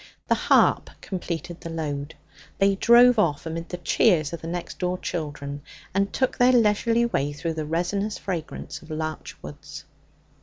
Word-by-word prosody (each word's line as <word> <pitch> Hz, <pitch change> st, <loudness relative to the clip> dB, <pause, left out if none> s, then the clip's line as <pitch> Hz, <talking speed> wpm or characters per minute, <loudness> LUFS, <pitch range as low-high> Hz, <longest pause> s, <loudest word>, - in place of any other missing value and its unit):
The -, -, +5 dB
harp -, -, +3 dB
completed 175 Hz, -2 st, -5 dB
the 165 Hz, -, -6 dB
load. 150 Hz, -2 st, -4 dB, 0.4 s
They 195 Hz, 0 st, +4 dB
drove 235 Hz, +4 st, +6 dB
off 155 Hz, -7 st, +1 dB
amid 165 Hz, +1 st, -5 dB
the 180 Hz, -, -4 dB
cheers 170 Hz, -4 st, +2 dB
of 170 Hz, -, -5 dB
the 165 Hz, -, -6 dB
next 175 Hz, +1 st, -5 dB
door 180 Hz, 0 st, -1 dB
children, 145 Hz, -5 st, -5 dB, 0.3 s
and 200 Hz, +1 st, +1 dB
took 260 Hz, -, -1 dB
their 250 Hz, +1 st, +6 dB
leisurely 230 Hz, +1 st, +3 dB
way 145 Hz, -11 st, -1 dB
through 165 Hz, +3 st, -3 dB
the 155 Hz, -1 st, -4 dB
resinous 195 Hz, +6 st, -1 dB
fragrance 160 Hz, -4 st, -5 dB
of 160 Hz, -, -16 dB
larch 155 Hz, 0 st, -4 dB
woods. 145 Hz, -1 st, -9 dB
170 Hz, 160 wpm, -25 LUFS, 155-200 Hz, 0.4 s, drove